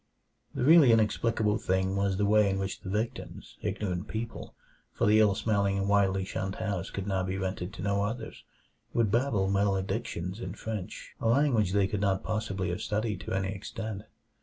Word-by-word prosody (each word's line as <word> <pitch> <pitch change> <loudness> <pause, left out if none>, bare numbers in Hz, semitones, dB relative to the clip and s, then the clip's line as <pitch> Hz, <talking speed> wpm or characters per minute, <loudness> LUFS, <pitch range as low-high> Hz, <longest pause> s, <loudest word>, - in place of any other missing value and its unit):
The - - -1
really 150 -3 +7
inexplicable 110 -1 +2
thing 95 +1 0
was 100 -1 +1
the 105 - +2
way 105 0 +4
in 95 - 0
which 95 0 -3
the 95 - -8
victims 110 +4 -4
ignorant 95 -2 -2
people, 115 +1 -6 0.4
for - - 0
the 105 +1 +5
ill 105 -2 +4
smelling 100 -2 +1
and 100 0 -1
widely 95 -2 +2
shunned 95 0 -3
house 100 -5 -3
could 100 - -5
now 95 -2 0
be 95 +1 -2
rented 95 -1 -3
to 115 - -7
no 100 0 +1
others 110 +4 -4 0.5
would 115 -4 +2
babble 115 -5 +2
maledictions 95 -1 -1
in - - -5
French, 110 -5 -6
a - - -1
language 115 -6 +3
they 100 -1 +3
could 100 +1 -2
not 95 -1 +1
possibly 100 -4 -2
have 85 - -3
studied 105 -1 -1
to 80 - -5
any 95 0 0
extent. 110 +1 -6
100 Hz, 185 wpm, -29 LUFS, 95-110 Hz, 0.5 s, really